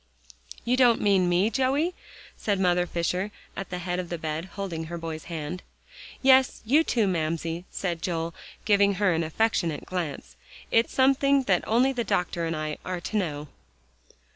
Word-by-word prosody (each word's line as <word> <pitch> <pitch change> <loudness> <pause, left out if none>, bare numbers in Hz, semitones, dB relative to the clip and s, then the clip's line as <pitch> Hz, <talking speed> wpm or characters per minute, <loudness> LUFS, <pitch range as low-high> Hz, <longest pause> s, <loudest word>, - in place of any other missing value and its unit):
"You 245 +2 +2
don't 245 -3 +5
mean 195 -3 +3
me, 185 +5 +2
Joey?" 275 +7 +1 0.4
said 205 -3 -1
Mother 180 -1 +2
Fisher 180 +4 -1 0.3
at 195 - -5
the 180 - -4
head 180 0 -3
of 180 -2 -5
the 175 - -3
bed, 160 +1 -3
holding 180 -5 -4
her 170 +1 -6
boy's 160 -1 -6
hand. 165 +1 -5 0.6
"Yes; 265 -1 +5
you, 290 +8 +4
too, 230 -8 +1
Mamsie," 165 -1 -2
said 170 -4 -3
Joel, 165 0 -2 0.3
giving 200 -1 +4
her 185 -1 +2
an 165 0 0
affectionate 165 -2 0
glance, 150 - -5 0.4
"it's 230 +1 +3
something 275 +1 +3
that 195 -7 +2
only 250 +5 +3
the 245 -2 -1
doctor 175 -4 -1
and 165 - -2
I 155 -1 -4
are 185 -1 -3
to 220 - -5
know." 150 -7 -1
180 Hz, 165 wpm, -26 LUFS, 165-225 Hz, 0.6 s, don't